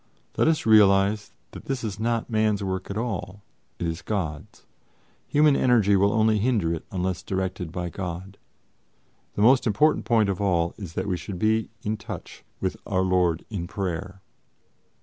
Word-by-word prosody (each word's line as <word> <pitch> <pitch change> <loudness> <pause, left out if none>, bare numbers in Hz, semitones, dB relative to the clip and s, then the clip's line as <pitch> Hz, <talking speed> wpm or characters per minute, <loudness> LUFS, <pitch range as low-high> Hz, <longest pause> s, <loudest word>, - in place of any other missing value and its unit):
Let - - +2
us 160 -1 +1
realize 105 -1 +4 0.2
that - - -11
this 135 -2 -3
is 105 -2 -4
not 115 0 0
man's 110 -2 +1
work 95 -1 -3
at 100 - -4
all, 100 -4 -4 0.3
it - - -3
is 80 -1 -3
God's. 80 -9 -4 0.6
Human 150 -1 +4
energy 115 -7 +4
will 100 +1 +3
only 110 0 +3
hinder 105 -8 +1
it 80 - -5
unless 90 -2 -2
directed 95 -3 -3
by 90 -1 -4
God. 95 +1 -6 1.0
The 105 - +1
most 125 +2 +5
important 115 +9 +2
point 115 -4 +3
of 95 0 -2
all 85 -4 +1
is 95 -6 -8
that - - -2
we 90 -2 0
should 95 +1 -7
be 110 +3 +1
in 110 +1 -1
touch - - -9 0.2
with - - -2
Our 95 0 +1
Lord 90 -3 +1
in 90 -5 -4
prayer." 95 0 -4
100 Hz, 170 wpm, -25 LUFS, 90-110 Hz, 1.0 s, most